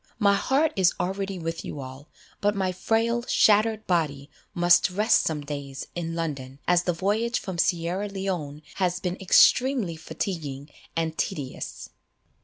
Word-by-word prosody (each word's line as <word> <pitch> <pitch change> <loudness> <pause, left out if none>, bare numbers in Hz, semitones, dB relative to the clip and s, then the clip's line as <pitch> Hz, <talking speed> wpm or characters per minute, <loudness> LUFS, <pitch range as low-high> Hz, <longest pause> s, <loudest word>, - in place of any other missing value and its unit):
My 205 -3 +4
heart 285 +9 +2
is 185 -3 +3
already 195 +1 -2
with 165 -1 -4
you 145 - -6
all, 130 +3 -9 0.3
but 205 0 +1
my 190 -2 0
frail 230 +5 0
shattered 215 +1 +3
body 150 -5 -1 0.2
must 175 +1 +5
rest 210 +5 +3
some 155 -2 -2
days 140 -2 -6
in 165 -1 -4
London, 140 -5 -4
as 180 0 +3
the 180 - +2
voyage 215 +8 0
from 185 -4 -5
Sierra 175 +4 0
Leone 180 -7 -4
has 180 -2 0
been 180 -1 -2
extremely 235 0 +4
fatiguing 150 -4 -5 0.2
and 165 -1 -1
tedious." 135 -4 -4
180 Hz, 145 wpm, -26 LUFS, 155-200 Hz, 0.3 s, must